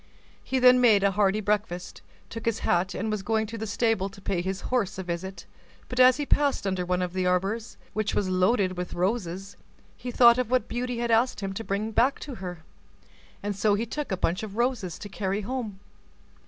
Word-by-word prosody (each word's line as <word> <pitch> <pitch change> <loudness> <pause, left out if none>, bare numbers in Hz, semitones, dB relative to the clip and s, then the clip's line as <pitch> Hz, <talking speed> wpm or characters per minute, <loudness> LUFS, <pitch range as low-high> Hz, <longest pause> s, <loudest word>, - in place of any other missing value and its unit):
He 265 - -1
then 250 0 +6
made 215 -5 +5
a 200 - +4
hearty 200 +1 +2
breakfast, 200 -4 -2 0.3
took 225 0 -7
his 225 -1 +1
hat, 180 +2 +1
and 220 +2 -2
was 215 -2 -2
going 220 +2 0
to 225 +2 -7
the 220 0 -4
stable 210 -2 +1
to 195 - -14
pay 190 -2 -1
his 190 +1 -3
horse 240 -8 -1
a 190 - -4
visit; 180 +2 -5 0.4
but 250 - -4
as 255 0 +7
he 295 - -2
passed 285 -5 +2
under 190 -2 0
one 180 0 +1
of 180 0 -4
the 185 -1 0
arbors, 195 +6 -1 0.2
which 215 -1 -1
was 200 - +1
loaded 185 0 +2
with 180 - -4
roses, 190 0 -2 0.4
he 250 - -7
thought 240 0 +6
of 250 - -1
what 255 -3 +1
Beauty 245 0 -3
had 235 0 -1
asked 230 +1 +2
him 195 -1 -3
to 225 - -5
bring 210 +2 -2
back 245 +5 +3
to 285 - -6
her, 175 -3 -6 0.8
and 205 0 -2
so 205 +1 +2
he 220 +3 -1
took 290 +2 -5
a 190 - 0
bunch 175 0 0
of 215 -1 -7
roses 235 -8 -1
to - - -8
carry 195 0 -2
home. 220 -3 -4
205 Hz, 215 wpm, -27 LUFS, 190-235 Hz, 0.8 s, as